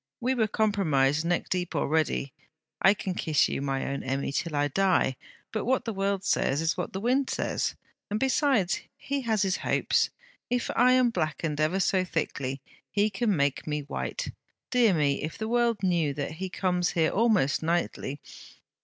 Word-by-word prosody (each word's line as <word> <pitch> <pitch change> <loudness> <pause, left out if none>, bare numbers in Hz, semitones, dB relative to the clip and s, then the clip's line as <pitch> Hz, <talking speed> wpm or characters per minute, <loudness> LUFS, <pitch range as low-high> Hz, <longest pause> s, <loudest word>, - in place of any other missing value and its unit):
We 255 +2 +1
were 225 -4 +1
compromised 160 -10 +2
neck 175 0 0
deep 180 -2 -2
already. 145 -2 0 0.5
I 195 +2 +6
can 190 -2 -3
kiss 155 -4 +2
you, - - -3
my 135 -1 -1
own 140 0 -3
Emmy, 135 +1 -2
till 155 +2 -2
I 145 0 +2
die; 185 -4 +2 0.4
'but 220 - -2
what 260 +2 +1
the 225 - -2
world 195 0 -1
says, 145 -7 +1
is 165 +1 +1
what - - -4
the 190 - -4
wind 255 +5 +1
says. - - -1 0.3
Besides 250 -2 +1 0.2
he 280 0 -3
has 220 -4 +1
his 190 -1 +1
hopes.... - - +1 0.4
If 245 -1 0
I 250 +2 +5
am 255 -2 +4
blackened 155 -4 -2
ever 165 +5 +1
so 190 -1 +2
thickly, 140 -6 -3 0.3
he 210 +1 +1
can 215 -3 +1
make 140 -1 0
me 150 0 -1
white. - - -4 0.4
Dear 235 -7 +4
me! 145 -3 +1
if 155 +2 -5
the 220 - -3
world 235 -3 +1
knew 170 -6 +1
that 140 -1 -3
he 185 +4 -5
comes 180 -1 0
here 160 -2 +2
almost 205 - +2
nightly! 160 -4 -1
185 Hz, 175 wpm, -27 LUFS, 150-220 Hz, 0.5 s, I